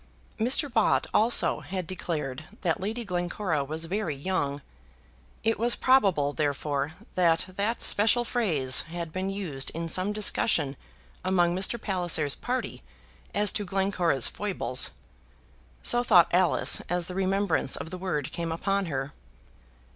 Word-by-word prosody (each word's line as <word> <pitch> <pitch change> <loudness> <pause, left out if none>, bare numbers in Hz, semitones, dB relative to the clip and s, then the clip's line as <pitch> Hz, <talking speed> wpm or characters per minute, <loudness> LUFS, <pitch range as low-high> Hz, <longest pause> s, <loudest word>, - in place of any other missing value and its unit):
Mr. 255 +6 +2
Bott 230 -5 +2
also 225 +3 +4
had 185 -2 -5
declared 155 -5 -4 0.2
that 170 -5 0
Lady 225 +5 -4
Glencora 175 -3 -2
was 155 +4 -4
very 180 -3 -2
young. 145 -3 -2 0.8
It 225 -1 +1
was 235 +1 +2
probable, 195 - +3
therefore, 145 0 -2 0.2
that 170 -3 +2
that 200 +5 -2
special 225 +4 +3
phrase 160 - +2
had 165 -1 -6
been 185 +1 -2
used 170 -10 -2
in 165 0 -3
some 185 +4 +1
discussion 210 -8 +1 0.5
among 175 -2 +2
Mr. 195 +5 +2
Palliser's 175 -8 0
party 255 +1 -4 0.5
as 205 0 +4
to 210 - -2
Glencora's 185 - 0
foibles. 195 -10 -2 0.9
So 240 0 +3
thought 180 -8 +5
Alice 180 0 +4
as 175 0 0
the 180 - -6
remembrance 190 -5 +1
of 160 - -6
the 185 - -5
word 165 -7 -3
came 170 -1 -4
upon 195 +3 -1
her. 135 -2 -4
180 Hz, 135 wpm, -27 LUFS, 155-205 Hz, 0.9 s, thought